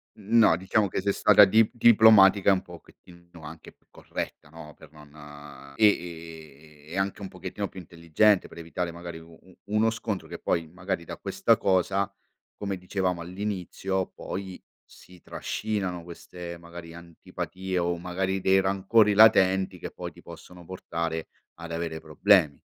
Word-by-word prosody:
No, 110 -3 +3
diciamo 95 +2 0
che - - -3
sei 100 +1 0
stata 105 - +6
di 110 +3 +5
diplomatica, 110 -4 +6
un 95 - -1
pochettino 85 0 -16
anche 80 +1 -11
più - - -38
corretta, - - -7
no, 75 -1 -12
per - - -16
non 75 -2 -14
e 105 - +5
e 80 -5 -5
e 90 - -5
anche 100 +1 -3
un 95 - -6
pochettino 95 +3 -6
più 95 - -11
intelligente 85 +4 +1
per 85 - -13
evitare 85 +1 -4
magari 85 0 -9
u 80 0 -15
u 95 -1 -21 0.2
uno 110 +1 +3
scontro 110 -3 -4
che - - -8
poi 85 -1 -2
magari 90 +1 -5
da - - -8
questa - - +1
cosa, 95 +1 0 0.4
come 100 -2 -4
dicevamo 90 -1 -2
all'inizio, 95 0 -3
poi 95 0 -8 0.2
si 90 -1 -18
trascinano 95 -5 -4
queste 85 0 -10
magari 85 -1 -11
antipatie 90 +2 -6
o 85 0 -1
magari 95 +2 -2
dei 95 +1 +3
rancori 100 +2 +2
latenti 95 -4 +4
che - - -6
poi - - -8
ti - - -17
possono 90 -1 -13
portare 85 -2 -5 0.3
ad 85 0 -10
avere 85 -1 -4
problemi. 80 0 +2
90 Hz, 155 wpm, -26 LUFS, 85-95 Hz, 0.4 s, stata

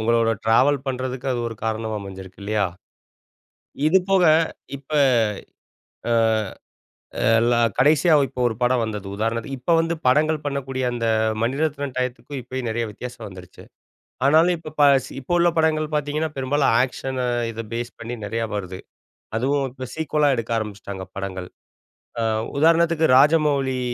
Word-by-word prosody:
உங்களோட 115 0 +2
டிராவல் 130 +6 +4
பண்றதுக்கு 130 0 -4
அது 120 - -2
ஒரு 115 - -7
காரணமா 110 0 -2
அமஞ்சிருக்கு 95 -1 -10
இல்லையா? 105 0 0 1.2
இது 175 +5 +5
போக 190 -2 +4 0.5
இப்ப 140 +1 -19 1.2
அ, - - +3 1.3
எல்லா 120 +1 +2 0.2
கடைசியா 155 +5 +4
இப்ப 125 - -10
ஒரு 110 - -3
படம் 125 0 +2
வந்தது. 105 -3 -4
உதாரணத்துக்கு, 115 +5 -2
இப்ப 170 +7 +1
வந்து 165 +1 0
படங்கள் 155 +4 +3
பண்ணக்கூடிய 135 -2 -3
அந்த 115 -1 -2 0.4
மணிரத்னம் 140 +2 -1
டயத்துக்கும் 130 +2 -3
இப்பயும் 125 0 -5
நெறைய 115 +1 -1
வித்தியாசம் 125 +4 -8
வந்துருச்சு. 90 -2 -12 0.6
ஆனாலும் 160 +5 +5
இப்ப 155 -1 -10
ப - - +6 0.2
சி - - -12
இப்ப 140 - -3
உள்ள 175 0 +4
படங்கள் 155 -1 +2
பாத்தீங்கன்னா, 150 +2 -1
பெரும்பாலும் 135 +2 +1
ஆக்க்ஷனா 130 0 -2 0.3
இத 115 0 -6
பேஸ் 120 +1 -3
பண்ணி 115 +1 -5
நெறையா 115 +3 -2
வருது. 95 -2 -5 0.6
அதுவும் 135 +3 0
இப்ப 130 0 -8
சீக்குவலா 150 -2 +1
எடுக்க 115 -1 -4
ஆரம்பிச்சுட்டாங்க 100 -3 -6
படங்கள். 95 -2 -5 0.7
அ, - - 0 0.4
உதாரணத்துக்கு 165 +1 +3
ராஜமவுலி 140 -3 +3
130 Hz, 135 wpm, -22 LUFS, 115-150 Hz, 1.3 s, ப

